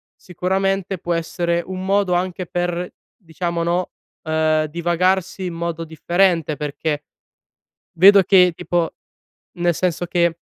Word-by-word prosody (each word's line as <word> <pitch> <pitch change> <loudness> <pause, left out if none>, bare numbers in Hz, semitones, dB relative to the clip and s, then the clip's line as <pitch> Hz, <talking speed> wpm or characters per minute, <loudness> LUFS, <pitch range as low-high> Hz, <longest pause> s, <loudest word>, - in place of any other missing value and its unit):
sicuramente, 190 +1 -2
può 175 +1 -2
essere 170 +1 -1
un 185 0 -6
modo 195 -1 +2
anche 180 0 -2
per 175 0 -2 0.3
diciamo, 170 -1 -4
no, 175 +1 -1 0.3
ehm, 155 -1 +1
divagarsi 175 +4 0
in 175 - -4
modo 165 -1 -3
differente. 165 0 +1
Perché 150 0 -3 0.9
vedo 195 +2 +8
che 180 -1 +5
tipo 175 -2 -1 0.7
nel 175 -1 +2
senso 175 0 -1
che 170 -1 +1
175 Hz, 120 wpm, -20 LUFS, 165-185 Hz, 0.9 s, vedo